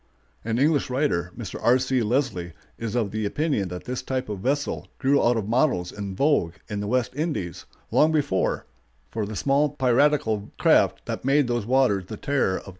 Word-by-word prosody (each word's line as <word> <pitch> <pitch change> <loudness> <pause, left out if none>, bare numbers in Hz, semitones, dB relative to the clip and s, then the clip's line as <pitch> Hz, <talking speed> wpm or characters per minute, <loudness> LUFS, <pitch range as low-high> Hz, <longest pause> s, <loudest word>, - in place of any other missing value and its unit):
An 115 0 -1
English 145 +1 +2
writer, 125 - 0
Mr. 115 -6 -6
R. 120 +2 +5
C. 130 0 0
Leslie, 110 - -1 0.2
is 115 -1 -4
of 110 -5 0
the 110 0 -2
opinion 135 - 0
that 90 0 -7
this 125 0 -4
type 130 -3 -3
of 105 -2 -4
vessel 140 +7 -1
grew 140 +1 +2
out 120 0 +3
of 105 -3 -2
models 115 - +1
in 100 -2 -6
vogue 135 - +2
in 105 -2 -4
the 100 - -3
West 125 +2 0
Indies, 145 - -3 0.3
long 155 +1 +4
before, 145 -11 0 0.5
for 110 -2 -2
the 110 - -6
small 140 +6 +2
piratical 130 -5 +1
craft - - +3
that - - -4
made 140 +2 +3
those 120 -3 -1
waters 125 -7 +2
the 110 - -7
terror 135 -9 0
of - - -4
travelers. - - -11
120 Hz, 190 wpm, -25 LUFS, 105-140 Hz, 0.5 s, R